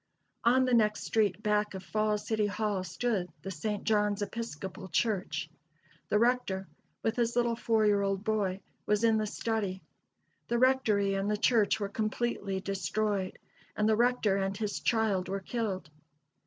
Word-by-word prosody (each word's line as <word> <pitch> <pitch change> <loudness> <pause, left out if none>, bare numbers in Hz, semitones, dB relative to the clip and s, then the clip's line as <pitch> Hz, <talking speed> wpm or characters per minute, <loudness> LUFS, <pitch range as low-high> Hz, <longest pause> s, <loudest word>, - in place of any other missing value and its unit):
On 255 +2 +4
the 255 - +1
next 215 -2 +3
street 215 -1 +1
back 210 -1 +1
of 190 - -6
Falls 215 0 0
City 215 -2 +1
Hall 205 -2 -1
stood 185 0 -1
the 195 - -4
St. 205 +4 -3
John's 210 -1 +1
Episcopal 195 -3 -6
Church. 185 -5 -1 0.6
The - - +3
rector, 225 -5 +1 0.4
with 225 +1 0
his 235 -1 +1
little 240 -1 +2
four 225 -1 +2
year 205 -1 +4
old 195 0 -1
boy, 200 -3 0 0.3
was 210 +1 +2
in 225 -1 +4
the 215 0 0
study. 205 -3 -2 0.6
The 235 - +1
rectory 230 -6 +3
and 195 +1 -1
the 210 - +1
church 220 -1 +3
were 200 - -1
completely 215 -2 -2
destroyed, 195 +1 -1 0.4
and 210 - +2
the 220 - +4
rector 235 -4 +2
and 195 0 -1
his 210 -2 -2
child 220 -5 +1
were 195 +1 -1
killed. 195 -6 -3
210 Hz, 160 wpm, -30 LUFS, 195-225 Hz, 0.6 s, On